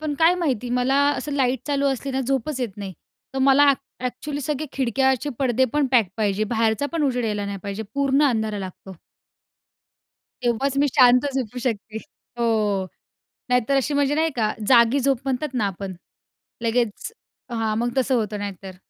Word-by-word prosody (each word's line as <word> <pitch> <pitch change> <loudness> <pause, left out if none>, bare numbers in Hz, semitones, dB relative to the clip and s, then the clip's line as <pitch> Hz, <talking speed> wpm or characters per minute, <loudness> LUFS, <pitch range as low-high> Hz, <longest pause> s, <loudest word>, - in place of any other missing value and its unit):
पण 305 -2 -2
काय 330 +2 +5
माहिती 255 -9 -1
मला 250 +2 +1 0.2
असं 295 - -4
लाईट 265 -3 +1
चालू 280 -1 +1
असली 270 +1 -2
ना 265 - 0
झोपच 265 +1 -1
येत 225 -5 -3
नाही. 200 -2 -6 0.4
तर - - -1
मला, 275 +2 +6 0.3
एक्चुअली 285 +4 -5
सगळे 300 +2 -2
खिडक्याचे 265 +2 +1
पडदे 260 -1 +2
पण 295 -1 +2
पॅक 230 -6 +4
पाहिजे, 210 -1 0
बाहेरचा 225 +4 0
पण 330 -2 0
उजेड 250 -4 0
यायला 210 -2 -1
नाही 200 0 -4
पाहिजे 200 +2 -4
पूर्ण 280 0 +2
अंधारा 220 -4 -1
लागतो. 190 0 -8 1.5
तेव्हाच 250 +3 0
मी 285 - +4
शांत 250 -1 +6
झोपू 250 -2 -3
शकते. 225 -3 -3 0.4
हो. 215 -5 +1 0.6
नाहीतर 250 +2 +2
अशी 275 +2 0
म्हणजे 285 0 +2
नाही 320 +1 +1
का? 215 -3 +1 0.2
जागी 235 +1 +5
झोप 270 -1 +2
म्हणतात 270 +1 -2
ना 220 -5 +1
आपण, 195 0 -5 0.7
लगेच, 230 - -1 0.4
हां 225 -2 -1
मग 240 +2 0
तसं 265 0 +2
होतं 215 -3 -1
नाहीतर. 195 -2 -7
250 Hz, 165 wpm, -23 LUFS, 220-275 Hz, 1.5 s, मला